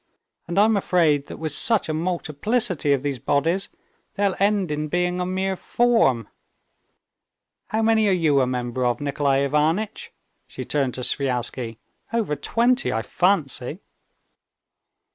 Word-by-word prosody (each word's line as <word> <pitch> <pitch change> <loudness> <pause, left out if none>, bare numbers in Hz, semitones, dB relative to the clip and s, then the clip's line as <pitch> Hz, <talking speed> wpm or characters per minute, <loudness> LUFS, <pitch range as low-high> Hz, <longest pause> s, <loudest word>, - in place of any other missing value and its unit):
And 170 - -4
I'm 215 +2 +5
afraid 160 -7 +2
that - - -8
with 155 -1 -4
such 225 +7 +3
a 155 - -2
multiplicity 170 - 0
of 140 -1 +1
these 140 -3 -2
bodies, 165 - 0 0.5
they'll 200 -2 +1
end 200 -4 +1
in 150 +1 -2
being 180 +2 -1
a 180 - -2
mere 190 +1 -1
form. 185 - +1 1.4
How 220 +1 -1
many 220 -1 +3
are - - +3
you 155 -6 +3
a 130 - +1
member 125 0 -3
of, 120 +2 0
Nikolay 140 -1 0
Ivanitch?" 160 +9 -1 0.4
she - - -7
turned 135 -4 -1
to 130 - -5
Sviazhsky—"over 130 - -3
twenty, 245 - +1
I 115 - -1
fancy." 160 -7 0
160 Hz, 135 wpm, -23 LUFS, 140-195 Hz, 1.4 s, I'm